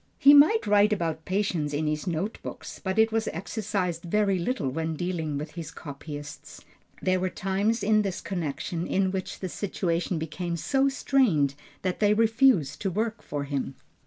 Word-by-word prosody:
He 285 Hz, -, +8 dB
might 310 Hz, +10 st, +6 dB
write 205 Hz, +1 st, +4 dB
about 165 Hz, -5 st, -1 dB
patience 185 Hz, -6 st, -1 dB
in 155 Hz, +2 st, -1 dB
his 150 Hz, +3 st, -2 dB
note 175 Hz, +6 st, -2 dB
book, -, -, -8 dB, 0.2 s
but 190 Hz, 0 st, -2 dB
it 220 Hz, 0 st, +4 dB
was 225 Hz, 0 st, 0 dB
exercised 190 Hz, -1 st, -2 dB
very 195 Hz, +2 st, +1 dB
little 210 Hz, -, -1 dB
when 160 Hz, +2 st, -2 dB
dealing 160 Hz, -3 st, -2 dB
with 150 Hz, +2 st, -5 dB
his 165 Hz, -3 st, -7 dB
copyists. 145 Hz, -1 st, -9 dB, 0.4 s
There 185 Hz, 0 st, +2 dB
were 185 Hz, 0 st, 0 dB
times 200 Hz, +5 st, 0 dB
in 215 Hz, +1 st, +4 dB
this 195 Hz, -3 st, -2 dB
connection 170 Hz, 0 st, -3 dB
in 190 Hz, -1 st, +1 dB
which 190 Hz, -1 st, -4 dB
the 190 Hz, -, -2 dB
situation 175 Hz, -2 st, -2 dB
became 170 Hz, +2 st, -3 dB
so 270 Hz, -, +2 dB
strained 240 Hz, -, +2 dB, 0.3 s
that 185 Hz, -2 st, -1 dB
they 210 Hz, 0 st, +4 dB
refused 225 Hz, -, +3 dB
to 195 Hz, -, 0 dB
work 220 Hz, +4 st, -2 dB
for 145 Hz, -1 st, -4 dB
him. 140 Hz, -1 st, -3 dB
185 Hz, 170 wpm, -27 LUFS, 160-210 Hz, 0.4 s, He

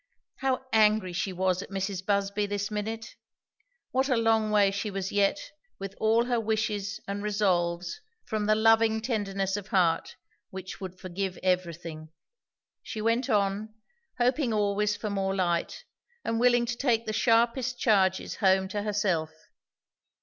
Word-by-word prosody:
How 265 Hz, -1 st, -1 dB
angry 215 Hz, -4 st, +4 dB
she 190 Hz, +2 st, -1 dB
was 185 Hz, 0 st, 0 dB
at -, -, -9 dB
Mrs. 195 Hz, -1 st, -3 dB
Busby 200 Hz, +1 st, 0 dB
this 205 Hz, +1 st, -3 dB
minute! 220 Hz, +2 st, -4 dB, 0.8 s
what 265 Hz, +2 st, +1 dB
a 255 Hz, -, +3 dB
long 225 Hz, -1 st, +2 dB
way 205 Hz, -2 st, +4 dB
she 200 Hz, +2 st, -3 dB
was 195 Hz, -1 st, -4 dB
yet, 205 Hz, +8 st, +1 dB, 0.3 s
with 195 Hz, 0 st, -6 dB
all 225 Hz, +2 st, +3 dB
her 245 Hz, -1 st, +1 dB
wishes 215 Hz, -2 st, -1 dB
and 200 Hz, +1 st, -3 dB
resolves, 185 Hz, -, 0 dB, 0.2 s
from 215 Hz, -1 st, -2 dB
the 215 Hz, -, +4 dB
loving 225 Hz, 0 st, +4 dB
tenderness 200 Hz, -5 st, -1 dB
of 205 Hz, -1 st, -5 dB
heart 175 Hz, -6 st, +1 dB, 0.3 s
which 190 Hz, +1 st, -8 dB
would 185 Hz, -1 st, -7 dB
forgive 185 Hz, +1 st, -4 dB
everything. 170 Hz, -3 st, -2 dB, 0.7 s
She 220 Hz, -, -6 dB
went 230 Hz, +3 st, +1 dB
on, 205 Hz, +1 st, 0 dB, 0.4 s
hoping 250 Hz, +1 st, +1 dB
always 210 Hz, 0 st, +1 dB
for 215 Hz, -, -4 dB
more 195 Hz, -1 st, -1 dB
light, 175 Hz, -3 st, -1 dB, 0.4 s
and 230 Hz, 0 st, 0 dB
willing 240 Hz, 0 st, +4 dB
to 240 Hz, 0 st, -2 dB
take 235 Hz, -4 st, +1 dB
the 215 Hz, -, -3 dB
sharpest 235 Hz, +3 st, +2 dB
charges 190 Hz, -5 st, +2 dB
home 190 Hz, -1 st, +3 dB
to 205 Hz, 0 st, -2 dB
herself. 200 Hz, -6 st, 0 dB
205 Hz, 150 wpm, -28 LUFS, 190-225 Hz, 0.8 s, angry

